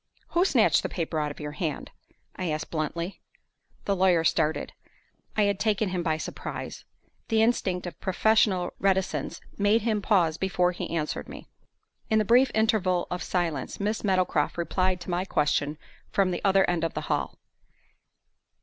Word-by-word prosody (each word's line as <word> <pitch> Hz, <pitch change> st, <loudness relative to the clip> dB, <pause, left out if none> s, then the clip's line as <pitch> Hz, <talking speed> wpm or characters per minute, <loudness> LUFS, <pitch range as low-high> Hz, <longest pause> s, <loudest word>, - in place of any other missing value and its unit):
"Who 350 Hz, +2 st, +2 dB
snatched -, -, +4 dB
the -, -, -3 dB
paper 165 Hz, -2 st, -2 dB
out 150 Hz, -1 st, -1 dB
of 145 Hz, -, -9 dB
your 150 Hz, -1 st, -5 dB
hand?" 155 Hz, 0 st, -4 dB, 0.4 s
I 180 Hz, -2 st, -3 dB
asked, 155 Hz, 0 st, -3 dB
bluntly. 170 Hz, +3 st, -3 dB, 0.6 s
The 200 Hz, -, +1 dB
lawyer 180 Hz, -3 st, +3 dB
started. 160 Hz, -1 st, +1 dB, 0.6 s
I 210 Hz, -, +4 dB
had 200 Hz, -1 st, +1 dB
taken 210 Hz, -1 st, +1 dB
him 180 Hz, -1 st, -2 dB
by 160 Hz, -2 st, 0 dB
surprise. -, -, -6 dB, 0.4 s
The 220 Hz, -1 st, +3 dB
instinct 190 Hz, -6 st, 0 dB
of 175 Hz, -4 st, -7 dB
professional 190 Hz, -2 st, +2 dB
reticence 185 Hz, -5 st, 0 dB, 0.2 s
made 205 Hz, +3 st, +3 dB
him 215 Hz, -2 st, 0 dB
pause 175 Hz, -6 st, +2 dB
before 180 Hz, -2 st, +1 dB
he 175 Hz, -, -5 dB
answered 155 Hz, -2 st, -3 dB
me. -, -, -10 dB, 0.6 s
In 220 Hz, -, +3 dB
the 215 Hz, -, +2 dB
brief 245 Hz, +4 st, +5 dB
interval 200 Hz, -5 st, +2 dB
of 180 Hz, 0 st, -3 dB
silence, 165 Hz, -7 st, -2 dB
Miss 210 Hz, +2 st, -1 dB
Meadowcroft 185 Hz, -4 st, +1 dB
replied 185 Hz, +1 st, 0 dB
to 175 Hz, -, -5 dB
my 175 Hz, +1 st, 0 dB
question 150 Hz, -3 st, 0 dB, 0.3 s
from 195 Hz, -2 st, +2 dB
the 175 Hz, -, -3 dB
other 195 Hz, -1 st, +4 dB
end 175 Hz, -2 st, 0 dB
of 165 Hz, -, -2 dB
the 155 Hz, -, -2 dB
hall. 70 Hz, -, -2 dB
180 Hz, 165 wpm, -27 LUFS, 165-200 Hz, 0.6 s, brief